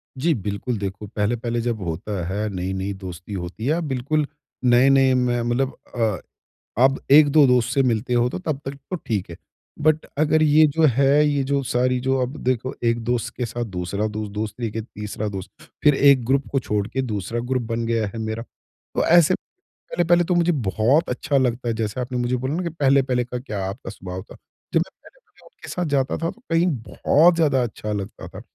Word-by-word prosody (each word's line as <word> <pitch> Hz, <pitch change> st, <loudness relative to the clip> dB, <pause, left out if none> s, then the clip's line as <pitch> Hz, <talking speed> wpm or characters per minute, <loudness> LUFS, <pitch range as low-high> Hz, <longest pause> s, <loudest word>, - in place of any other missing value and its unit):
जी 160 Hz, +5 st, +1 dB
बिल्कुल, 105 Hz, +2 st, -3 dB
देखो 100 Hz, +1 st, -5 dB
पहले-पहले 115 Hz, +3 st, -1 dB
जब 115 Hz, -3 st, -2 dB
होता 90 Hz, +2 st, -3 dB
है 105 Hz, +3 st, -2 dB
नई-नई 95 Hz, +1 st, -3 dB
दोस्ती 95 Hz, 0 st, -8 dB
होती 90 Hz, +4 st, -5 dB
है। 160 Hz, +5 st, +1 dB
बिल्कुल, 140 Hz, +4 st, 0 dB, 0.4 s
नए-नए 130 Hz, +2 st, +5 dB
में 125 Hz, -1 st, +1 dB
मतलब 120 Hz, +3 st, 0 dB, 0.2 s
अ, 110 Hz, -5 st, 0 dB, 0.6 s
अब 135 Hz, +1 st, +4 dB
1-2 145 Hz, 0 st, +7 dB
दोस्त 125 Hz, -2 st, +2 dB
से 140 Hz, -, +3 dB
मिलते 120 Hz, 0 st, 0 dB
हो 120 Hz, 0 st, +3 dB
तो -, -, -5 dB
तब 155 Hz, -6 st, -3 dB
तक 135 Hz, -, -4 dB, 0.2 s
तो -, -, 0 dB
ठीक 105 Hz, -, -3 dB
है। 85 Hz, -, -7 dB, 0.5 s
बट 155 Hz, 0 st, +2 dB
अगर 155 Hz, +1 st, +3 dB
ये 155 Hz, +1 st, +6 dB
जो 160 Hz, +3 st, 0 dB
है 140 Hz, +2 st, +4 dB
ये 140 Hz, -2 st, +1 dB
जो 140 Hz, +1 st, 0 dB
सारी 125 Hz, 0 st, +1 dB
जो 130 Hz, +1 st, 0 dB
अब 130 Hz, +4 st, -3 dB
देखो 130 Hz, 0 st, 0 dB
एक 115 Hz, 0 st, +2 dB
दोस्त 120 Hz, 0 st, -1 dB
के 125 Hz, -, -1 dB
साथ 120 Hz, +1 st, -4 dB
दूसरा 95 Hz, +2 st, -3 dB
दोस्त, 105 Hz, -1 st, -5 dB
दोस्त 105 Hz, +3 st, -4 dB
लेके 110 Hz, -1 st, -2 dB
तीसरा 105 Hz, -1 st, -6 dB
दोस्त 95 Hz, -1 st, -7 dB, 0.3 s
फ़िर 150 Hz, -2 st, +6 dB
1 135 Hz, -3 st, +5 dB
ग्रुप 135 Hz, +2 st, +1 dB
को 135 Hz, -, +2 dB
छोड़ 105 Hz, -4 st, -1 dB
के 130 Hz, -, -2 dB
दूसरा 110 Hz, -2 st, -3 dB
ग्रुप 125 Hz, +1 st, -1 dB
बन 115 Hz, 0 st, -1 dB
गया 115 Hz, -2 st, 0 dB
है 100 Hz, -, -8 dB
मेरा। 110 Hz, +1 st, -3 dB, 0.5 s
तो -, -, +2 dB
ऐसे 175 Hz, +1 st, +6 dB, 0.4 s
पहले-पहले 175 Hz, 0 st, +1 dB
तो 180 Hz, +1 st, 0 dB
मुझे 175 Hz, 0 st, +3 dB
बहुत 125 Hz, -, +1 dB
अच्छा 140 Hz, +3 st, 0 dB
लगता 125 Hz, -1 st, 0 dB
है 115 Hz, -, +1 dB
जैसे 110 Hz, +1 st, -3 dB
आपने 125 Hz, 0 st, -3 dB
मुझे 125 Hz, +1 st, 0 dB
बोला 130 Hz, +4 st, -2 dB
न 185 Hz, -, -2 dB
कि 170 Hz, -, -2 dB
पहले-पहले 135 Hz, -5 st, +2 dB
का 125 Hz, 0 st, -5 dB
क्या 105 Hz, -6 st, -5 dB
आपका 100 Hz, -, -6 dB
स्वभाव 95 Hz, -2 st, -7 dB
था। -, -, -14 dB, 0.4 s
जब -, -, +4 dB
मैं -, -, -3 dB
पहले -, -, -22 dB
उनके -, -, -15 dB
साथ 180 Hz, -1 st, -2 dB
जाता 135 Hz, -1 st, 0 dB
था 165 Hz, 0 st, -2 dB
तो 230 Hz, +4 st, -19 dB
कहीं 165 Hz, +2 st, +3 dB, 0.2 s
बहुत 165 Hz, +4 st, +4 dB
ज़्यादा 145 Hz, -6 st, +2 dB
अच्छा 105 Hz, -2 st, -5 dB
लगता 100 Hz, -2 st, -5 dB
था, -, -, -10 dB
125 Hz, 200 wpm, -22 LUFS, 105-140 Hz, 0.6 s, 1-2